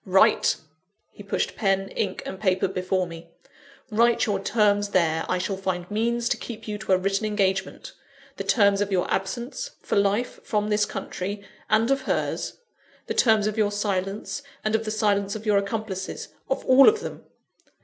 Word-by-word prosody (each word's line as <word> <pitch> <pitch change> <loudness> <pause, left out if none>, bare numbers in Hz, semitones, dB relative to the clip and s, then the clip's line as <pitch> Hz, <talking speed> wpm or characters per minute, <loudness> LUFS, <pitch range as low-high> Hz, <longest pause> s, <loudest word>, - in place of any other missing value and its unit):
Write!" 190 0 +4 0.6
(he - - -13
pushed 200 - -2
pen, 195 -1 +1
ink, 195 -3 -3
and 190 - -6
paper 190 -2 +2
before 185 0 -1
me,) 170 -1 -10 0.6
"write 235 +2 +3
your 205 -3 0
terms 205 0 +2
there 160 -4 +2
I 185 - +2
shall 190 +2 -2
find 185 -1 -3
means 235 +2 0
to - - +1
keep 230 -2 -8
you 210 -1 -4
to 215 -2 0
a - - +5
written 195 +3 0
engagement 195 - -1 0.4
the - - -3
terms 200 -3 +3
of 205 0 -1
your 185 -2 +2
absence, 235 - -3
for - - 0
life, 200 +5 +1
from 210 -1 -1
this 210 0 +2
country; 200 +2 -5 0.2
and 225 +4 +3
of 275 - +2
hers: - - -1 0.5
the - - -3
terms 220 -3 +4
of 215 +1 -1
your 205 -1 +2
silence, 205 +4 -2 0.2
and 215 - 0
of 220 0 +1
the - - -2
silence 205 -2 +1
of 215 +1 -7
your 205 -2 +4
accomplices; 200 -1 -4 0.2
of - - -1
all 260 +1 +8
of 435 0 -1
them. - - -7
205 Hz, 180 wpm, -25 LUFS, 190-220 Hz, 0.6 s, all